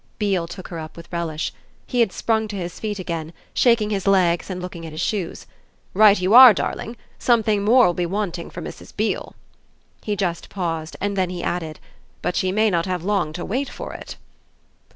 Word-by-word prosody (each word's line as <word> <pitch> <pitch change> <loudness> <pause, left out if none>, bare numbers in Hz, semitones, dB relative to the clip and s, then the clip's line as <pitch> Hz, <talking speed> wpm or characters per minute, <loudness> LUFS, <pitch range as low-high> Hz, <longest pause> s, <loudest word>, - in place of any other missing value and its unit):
Beale 195 -5 0
took 185 +2 -9
her 170 - -5
up 155 +1 -9
with 170 +1 -12
relish; 165 -2 -2 0.3
he 250 - -2
had 225 -5 +4
sprung 220 +1 0
to 205 - -6
his 175 -3 -5
feet 210 -2 -3
again, 165 -3 -4 0.2
shaking 230 -4 +3
his 195 -1 -2
legs 180 -3 +3
and 185 -1 -4
looking 180 -2 -7
at 160 - -7
his 155 - -6
shoes. 185 -1 -2 0.5
"Right 210 0 +6
you 185 +3 +1
are, 250 -3 +11
darling! 230 +5 -3 0.2
Something 220 -4 +2
more 245 +4 +6
will 175 - +2
be 175 0 -1
wanted 185 -3 -3
for - - -7
Mrs. - - -10
Beale." - - -2 0.7
He 210 - -2
just 175 -4 -2
paused, 165 -3 -4
then 200 -2 0
he 175 -1 -5
added: 160 -3 -3 0.4
"But 180 - -1
she 185 -2 +1
may 215 +2 +2
not 170 0 0
have 180 -2 -2
long 200 -5 0
to 175 +1 -5
wait 265 +6 -2
for - - -7
it." - - -9
185 Hz, 195 wpm, -22 LUFS, 170-210 Hz, 0.7 s, are